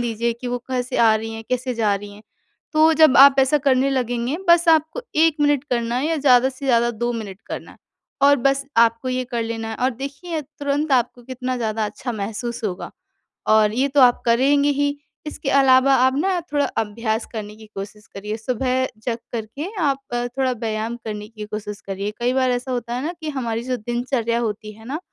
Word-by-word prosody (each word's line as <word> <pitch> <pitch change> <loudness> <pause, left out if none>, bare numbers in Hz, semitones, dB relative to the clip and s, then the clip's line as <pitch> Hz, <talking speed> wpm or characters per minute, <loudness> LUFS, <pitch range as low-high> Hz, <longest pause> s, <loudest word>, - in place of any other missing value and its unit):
दीजिए 235 0 -1
कि 255 - -5
वो 245 0 -2
कैसे 250 0 -2
आ 225 -2 +5
रही 225 +1 -3
हैं, 225 0 -8
कैसे 255 0 -1
जा 215 -3 +1
रही 205 +1 -7
हैं, 210 - -15 0.5
तो 315 +1 +5
जब 315 -4 +5
आप 275 +1 +8
ऐसा 270 +3 +4
करने 265 +1 +3
लगेंगे 245 +1 -1
बस 340 0 +5
आपको 320 +7 +3
1 320 0 +4
मिनट 290 -2 +2
करना 235 -1 0
है 265 +4 0
या 325 0 0
ज़्यादा 260 -3 +5
से 270 +1 -8
ज़्यादा 240 -2 +3
2 240 +1 -2
मिनट 205 -4 -6
करना - - -7
है - - -19 0.5
और 285 0 +6
बस 275 0 +2
आपको 230 +2 +3
ये 255 0 -1
कर 240 -2 -3
लेना 225 0 -4
है। 220 - -5
और 260 - +3
देखिए 280 +6 -5
तुरंत 285 +1 -2
आपको 245 -1 +1
कितना 255 +1 -4
ज़्यादा 220 -2 -1
अच्छा 245 +4 -5
महसूस 225 +3 -4
होगा 190 -3 -4 0.6
और 215 -1 +4
ये 260 +4 +1
तो 280 0 +3
आप 245 -1 +5
करेंगे 275 +5 +3
ही 285 0 0 0.3
इसके 300 -2 -4
अलावा 270 -1 +5
आप 260 - +3
ना 370 +4 +1
थोड़ा 290 -1 +2
अभ्यास 220 +1 -1
करने 210 -2 -6
की 220 0 -14
कोशिश 210 +2 -8
करिए। 210 +2 -4
सुबह 255 +3 -1 0.2
जग 235 -2 -1 0.2
करके 235 - -5
आप 275 -2 +1
अ, 240 0 -1
थोड़ा 260 +1 -1
व्यायाम 225 -1 -3
करने 210 -1 -5
की 215 -1 -9
कोशिश 210 -1 -6
करिए 195 +1 -3
कई 245 +1 +1
बार 260 -1 +2
ऐसा 245 +1 -2
होता 240 -1 -3
है 250 - -3
ना 340 - -2
कि 310 - -3
हमारी 235 -5 -3
जो 255 0 -2
दिनचर्या 240 0 -1
होती 215 -2 -3
है 220 +1 -16
ना 290 +5 -3
245 Hz, 210 wpm, -21 LUFS, 225-275 Hz, 0.6 s, आप